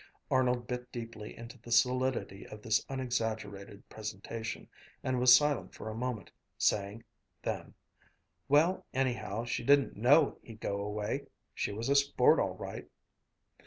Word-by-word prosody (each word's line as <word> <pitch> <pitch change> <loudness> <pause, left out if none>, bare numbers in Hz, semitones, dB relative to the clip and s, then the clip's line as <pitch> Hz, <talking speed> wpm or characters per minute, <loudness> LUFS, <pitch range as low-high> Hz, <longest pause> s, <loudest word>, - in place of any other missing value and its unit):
Arnold 125 -2 +2
bit 125 0 -5
deeply 115 -3 -7
into 115 +2 -10
the 120 +1 -12
solidity 125 -5 +1
of 105 0 -11
this 110 -1 +2
unexaggerated 110 -6 -3
presentation, 110 +1 -6 0.4
and 130 -1 0
was 125 0 +9
silent 145 +1 +1
for 110 - -6
a - - -6
moment, 120 -4 -4 0.3
saying 100 +2 0 0.4
then: - - -4 0.7
"Well, 160 +6 +4
anyhow, 120 -4 -1
she 120 - -2
didn't 140 +2 +4
know 140 +8 +4
he'd 110 -2 -12
go 100 -2 -2
away! 105 +7 -3 0.3
She - - -2
was 110 +4 -4
a 140 - +4
sport, 140 0 +5
all - - 0
right!" - - -7
120 Hz, 140 wpm, -32 LUFS, 110-130 Hz, 0.7 s, was